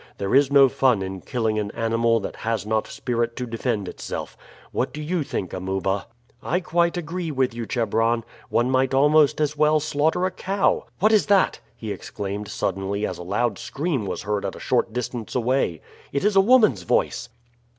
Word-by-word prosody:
There 100 - -2
is 140 +1 +5
no 140 -1 +7
fun 130 -6 +2
in 95 -1 -6
killing 110 -4 -1
an 105 -1 -2
animal 115 0 +2
that - - -6
has 115 -1 -2
not 110 0 0
spirit 120 -1 -2
to 125 - -3
defend 115 -3 -2
itself. - - -6 0.4
What - - -1
do 150 - -6
you 165 +3 -1
think, 95 - -4
Amuba?" 95 +1 -2 0.3
"I 175 - 0
quite 170 -1 +1
agree 175 +1 -4
with 130 -4 0
you, 115 -1 -5
Chebron. 115 0 +1 0.3
One 120 +2 +1
might 130 0 +2
almost 150 +2 +4
as 150 -1 0
well 150 +1 +3
slaughter 155 +4 +1
a 185 - 0
cow. 195 +2 0
What 215 +2 +3
is 215 -2 +4
that?" 200 -2 +3 0.2
he 110 -2 -6
exclaimed 100 +1 -5
suddenly 100 +2 -2
as - - -5
a - - -6
loud 105 +4 -1
scream 140 - -2
was 95 - -4
heard 105 0 -1
at - - -3
a - - -10
short 120 -2 0
distance 120 -1 -4
away. 125 - 0 0.3
"It 140 +7 -1
is 210 -1 +2
a 195 - +7
woman's 215 - +4
voice." 90 +6 0
120 Hz, 190 wpm, -23 LUFS, 105-150 Hz, 0.4 s, no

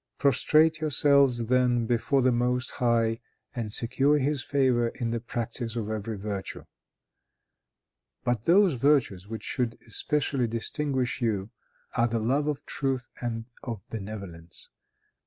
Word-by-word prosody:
Prostrate 155 +4 +3
yourselves, 140 -5 +3
then, 125 -1 +2
before 120 +4 +1
the 130 - +4
Most 125 +1 0
High, 115 -2 +1 0.4
and 115 -3 -3
secure 135 +6 +2
his 145 0 0
favor 130 -4 +2
by 120 - -2
the 115 0 -1
practice 115 0 -4
of 110 -2 -3
every 110 0 -4
virtue. 100 -1 -5 1.6
But 120 -3 -1
those 185 0 +5
virtues 125 -8 +2
which 110 -1 -6
should 125 -3 -2
especially 135 +2 0
distinguish 130 +3 -2
you, 105 -3 -1 0.4
are 115 - +3
the 115 0 -1
love 135 +7 +1
of 145 -1 -3
truth 135 -3 -2
and 115 -2 -3 0.2
of 115 -7 -6
benevolence. 95 -6 -8
120 Hz, 130 wpm, -27 LUFS, 115-135 Hz, 1.6 s, those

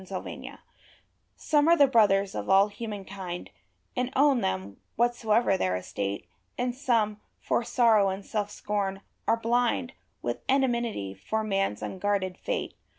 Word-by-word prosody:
The 185 0 -5
World - - -8 0.8
Some 295 0 +2
are 340 +1 +6
the 285 - +7
brothers 200 -6 +3
of - - -4
all 195 +2 +6
humankind, 195 -4 -6 0.4
And 250 +1 -1
own 275 -2 +4
them, 95 - -2 0.2
whatsoever 235 -3 +2
their 90 - 0
estate; 100 +1 -4 0.3
And 250 0 0
some, 230 -6 0 0.2
for - - 0
sorrow 225 -5 +4
and 190 +1 -5
self 205 -2 -2
scorn, 200 -2 -2 0.3
are 225 - +4
blind 240 +2 +1 0.3
With - - -2
enmity 235 - +1
for 220 - -3
man's 195 - -1
unguarded 190 -1 -1
fate. - - -3
210 Hz, 140 wpm, -28 LUFS, 195-240 Hz, 0.8 s, the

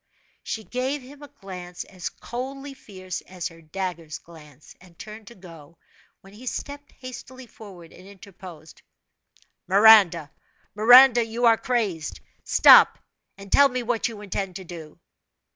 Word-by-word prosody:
She 220 - -6
gave 255 +4 -4
him 280 +3 -15
a 290 - -11
glance 180 -6 -10
as 185 -2 -8
coldly 270 +3 -8
fierce 185 -7 -9
as 185 -2 -6
her 165 -1 -17
dagger's 165 -1 -6
glance, 150 -4 -17
and 180 -2 -20
turned 215 -1 -12
to 235 - -13
go, 165 -3 -15 0.4
when 195 +1 -18
he 245 +5 -13
stepped 285 +3 -7
hastily 255 0 -11
forward, 190 -8 -15
and 185 +2 -16
interposed: 185 -5 -14 0.9
"Miranda 195 -6 +5 0.4
Miranda 245 +3 +6
you 230 +2 -3
are 230 -1 +6
crazed! 210 -11 -3 0.2
Stop - - +6 0.4
and 195 0 -13
tell 280 0 +5
me 255 -1 -4
what 235 0 -1
you 220 -3 -10
intend 195 -2 -5
to 190 - -8
do." 165 -3 -12
200 Hz, 145 wpm, -23 LUFS, 175-245 Hz, 0.9 s, Miranda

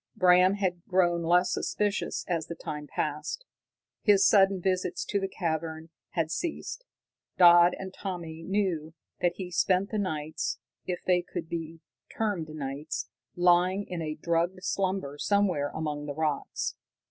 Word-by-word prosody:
Bram 180 +1 +5
had 180 -4 -1
grown 175 -2 +3
less 180 +2 +3
suspicious 210 -1 -1
as 165 -3 -1
the 170 - -5
time 150 -2 -6
passed. 150 - -3 0.6
His 200 -2 +5
sudden 195 -2 +5
visits 185 0 -1
to 200 - 0
the 195 - -1
cavern 160 -2 -3 0.2
had 165 -2 0
ceased. 345 - -4 0.5
Dodd 175 0 +8
and 190 -1 -7
Tommy 170 -5 -6
knew 170 -4 -1 0.2
that 175 -1 +2
he 180 -2 -6
spent 185 +2 +2
the 215 - 0
nights 155 -5 -2 0.3
if 180 -1 -3
they 180 -1 +3
could 175 -1 -6
be 165 -1 -5 0.4
termed 200 -8 -1
nights 150 0 -4 0.3
lying 180 +3 +3
in 175 -2 -4
a 155 -1 -3
drugged 170 +3 -1
slumber 185 -7 -1
somewhere 190 -8 +2
among 150 -1 -4
the 145 - -4
rocks. 155 -2 -1
175 Hz, 145 wpm, -28 LUFS, 160-190 Hz, 0.6 s, Dodd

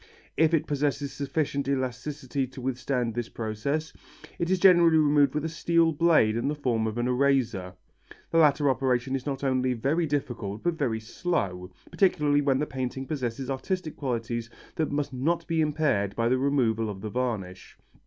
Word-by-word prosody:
If 160 +1 +4
it 155 - 0
possesses 145 -1 -1
sufficient 140 0 -2
elasticity 135 +1 -2
to 130 +1 -11
withstand 125 -2 -1
this 120 0 -3
process, 120 +9 -3 0.5
it 170 - -1
is 190 - +3
generally 175 -3 +6
removed 145 -2 +3
with 150 +1 -1
a - - +1
steel 165 0 +2
blade 150 -8 +3
in 120 +3 -1
the 150 - 0
form 120 -6 0
of 110 +1 -4
an 120 +1 0
eraser. 125 -8 +1 0.6
The 165 - +3
latter 145 -2 +4
operation 130 0 +1
is 135 +1 -5
not 140 -1 -3
only 130 -1 +1
very 145 +8 0
difficult 120 -8 -3
but 175 0 +1
very 130 -8 -1
slow, 100 - -3 0.2
particularly 150 -6 +2
when 140 -2 +2
the 150 - 0
painting 130 -1 -4
possesses 130 -3 -3
artistic 155 +5 -3
qualities 115 -3 -3 0.3
that 160 - -1
must 145 -1 -2
not 155 +7 0
be 165 -2 0
impaired 150 -10 0
by 115 0 +1
the 130 +1 +2
removal 120 -6 +1
of 95 -2 -7
the 105 - -5
varnish. 110 -7 -4
135 Hz, 175 wpm, -27 LUFS, 120-150 Hz, 0.6 s, generally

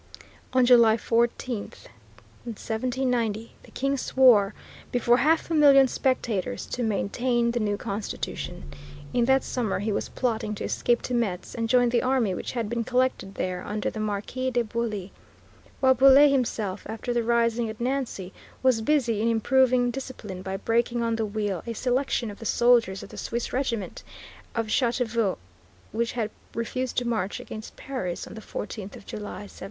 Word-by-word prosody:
On 255 -1 +4
July 235 -3 +6
14, 235 0 0 0.8
1790, 230 0 -2
the - - -17
King 275 +1 -1
swore, 235 -7 +4 0.4
before 240 0 +3
half 320 +4 +2
a - - +1
million 280 -3 +7
spectators, 230 - -1
to 250 - -4
maintain 235 +2 0
the 240 - -1
new 205 -2 0
constitution. 205 - -5 0.5
In 240 -1 +3
that 265 +1 +3
summer 235 -6 -1
he 210 +3 -2
was - - -2
plotting 220 -4 -2
to - - -6
escape 240 0 0
to 250 - -3
Metz 200 -7 -1
and 230 -1 -2
join 245 -1 +4
the 235 0 +2
army 255 -6 +1
which - - -5
had 235 -3 -2
been 235 +1 -2
collected 250 -5 0
there 180 -1 -3
under 210 0 -2
the 220 - -6
Marquis 215 +5 -2
de 245 -1 +1
Bouillé, 215 -4 -3 0.7
while 260 -1 +6
Bouillé 275 +3 +7
himself, 220 -7 -1
after 225 +2 -3
the 240 - +1
rising 235 0 +1
at 220 - -8
Nancy, 240 -7 -2 0.3
was 255 -4 +3
busy 235 -4 +1
in 225 - +1
improving 245 +2 +3
discipline 235 -8 -7
by 190 +1 -4
breaking 235 +3 0
on 230 0 0
the 225 -1 -1
wheel 205 -4 -2
a 230 - -2
selection 250 -1 0
of 205 - -12
the 225 - -8
soldiers 235 -6 +3
of - - -10
the - - -11
Swiss 235 0 -3
regiment 235 -7 -2 0.5
of 230 -1 0
Châteauvieux 235 -3 0 0.5
which 230 0 -1
had 220 -3 -2 0.2
refused 255 +2 -3
to 245 - +1
march 215 -4 -1
against 215 0 -8
Paris 220 -11 -4
on - - -10
the 220 - -8
14th 205 -1 -6
of - - -13
July, 210 -1 -6
1789. - - -13
235 Hz, 170 wpm, -26 LUFS, 215-250 Hz, 0.8 s, million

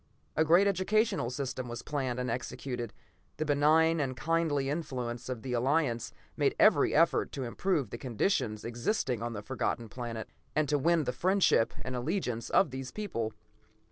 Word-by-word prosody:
A 160 - +4
great 170 +5 +5
educational 200 - +1
system 130 -1 -4
was 120 0 -6
planned 130 -4 -2
and 125 - -2
executed, 125 -1 -4 0.5
the 155 - -1
benign 155 +3 +4
and 130 -3 -2
kindly 160 -4 +1
influence 130 -6 -3
of 120 -4 -4
the 130 - -3
Alliance 125 -1 +1 0.2
made - - +1
every - - +5
effort - - +3
to 135 - -3
improve 140 - -1
the 120 - -6
conditions 115 - -1
existing 120 - -1
on 120 0 -3
the 105 -2 -6
Forgotten 120 -1 -2
Planet, 115 -1 -5 0.3
and 155 -1 +2
to 145 -1 +2
win 165 +2 +3
the 125 - -2
friendship 185 - +3
and 130 0 -4
allegiance 125 - -2
of 160 - +3
these 130 0 -5
people. 115 - -3
130 Hz, 165 wpm, -31 LUFS, 120-160 Hz, 0.5 s, great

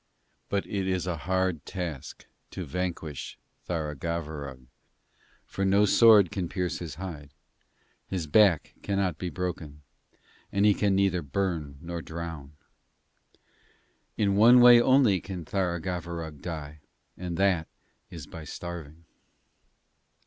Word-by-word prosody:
But 100 -1 -1
it 95 -2 -2
is 90 -2 0
a 90 -2 -2
hard 95 -4 0
task 85 -8 -6 0.2
to - - -6
vanquish 85 -2 -4 0.3
Tharagavverug, 75 -4 -4 0.8
for 95 - -4
no 100 +2 +4
sword 105 -3 +6
can 90 -4 -3
pierce 90 -4 -2
his 80 -4 -6
hide; 80 -5 -7 0.8
his 90 -4 -3
back 85 -1 +4
cannot 95 -5 -1
be 90 - -3
broken, 85 -5 -5 0.7
and 100 +1 +2
he 105 - +6
can 100 -1 +1
neither 95 -2 +2
burn 75 -2 -3
nor 85 0 -5
drown. 80 -3 -7 1.6
In 100 -2 +2
one 120 +4 +7
way 120 -1 +9
only 125 -8 +4
can 90 -4 -7
Tharagavverug 85 -4 -3
die, 75 -3 -6 0.4
and 90 -2 -5
that 95 -5 +2 0.4
is - - -8
by 80 - -10
starving.' 85 0 -8
90 Hz, 120 wpm, -28 LUFS, 80-95 Hz, 1.6 s, way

